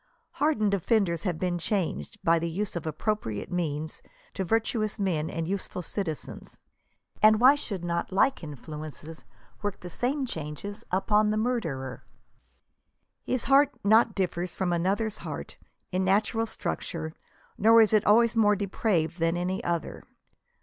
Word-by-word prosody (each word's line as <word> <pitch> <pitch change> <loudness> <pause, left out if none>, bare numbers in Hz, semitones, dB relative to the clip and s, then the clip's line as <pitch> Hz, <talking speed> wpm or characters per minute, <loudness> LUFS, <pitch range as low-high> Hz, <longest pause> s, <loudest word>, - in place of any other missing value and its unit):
Hardened 215 -10 +1
offenders 190 -3 +1
have 175 -4 -2
been 175 0 -1
changed, 190 0 -2
by 165 0 +4
the 170 +1 -2
use 195 +4 -3
of 165 -2 -4
appropriate 155 - -2
means, 160 -3 -2 0.3
to 190 - -2
virtuous 220 +1 0
men 170 -6 0
and 165 -1 -3
useful 185 -1 -3
citizens; 165 -4 -5 0.6
and 215 0 +6
why 255 +3 +8
should 200 - -5
not 170 +1 -2
like 260 +4 +2
influences 155 +2 -8 0.4
work 205 -1 -3
the 180 - -8
same 260 - -1
change 150 - -6 0.2
upon 210 +3 +2
the 215 - 0
murderer! 165 - -2 0.6
" - - -51
His 255 -2 0
heart 275 +1 +4
not 220 +1 +4
differs 180 -2 -2
from 180 -2 0
another's 195 +5 0
heart" - - -7 0.3
in 185 0 0
natural 215 +4 +2
structure, 160 -6 -4 0.5
nor 225 +2 +7
is 220 -1 +5
it 215 - +5
always 230 +2 +4
more 210 -2 +4
de 200 0 -2
praved 180 -5 0
than 165 +1 +1
any 180 +2 -2
other. 170 -2 -3
190 Hz, 150 wpm, -27 LUFS, 165-215 Hz, 0.6 s, why